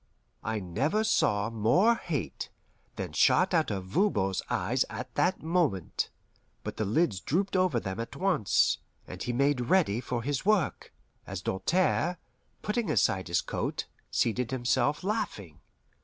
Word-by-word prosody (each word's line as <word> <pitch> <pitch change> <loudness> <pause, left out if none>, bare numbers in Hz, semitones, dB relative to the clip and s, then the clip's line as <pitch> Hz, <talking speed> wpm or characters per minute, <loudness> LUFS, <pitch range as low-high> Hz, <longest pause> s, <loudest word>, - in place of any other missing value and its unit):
I 110 -1 -1
never 140 - 0
saw 105 - +2
more 115 - +4
hate - - -4 0.5
than - - -5
shot 185 +1 +4
out 160 -2 +3
of 95 -3 -3
Voban's 95 - +1
eyes - - +1
at - - -6
that 185 -1 +1
moment; 160 - 0 0.5
but - - -5
the 110 - 0
lids 110 - +1
drooped 190 - -1
over 185 -9 +3
them 95 -1 -5
at 115 - -5
once, 180 - +2 0.3
and 90 +1 -8
he 120 - -1
made 140 +1 +2
ready 145 - +3
for 125 -2 -3
his 140 +1 -1
work, 200 -4 +1 0.4
as 95 -2 -5
Doltaire, 175 - +1 0.5
putting 215 +1 -1
aside 95 -1 +2
his 85 -1 +1
coat, - - -3 0.2
seated 115 +1 0
himself, 130 +4 +1
laughing. 105 - -3
130 Hz, 140 wpm, -29 LUFS, -, 0.5 s, more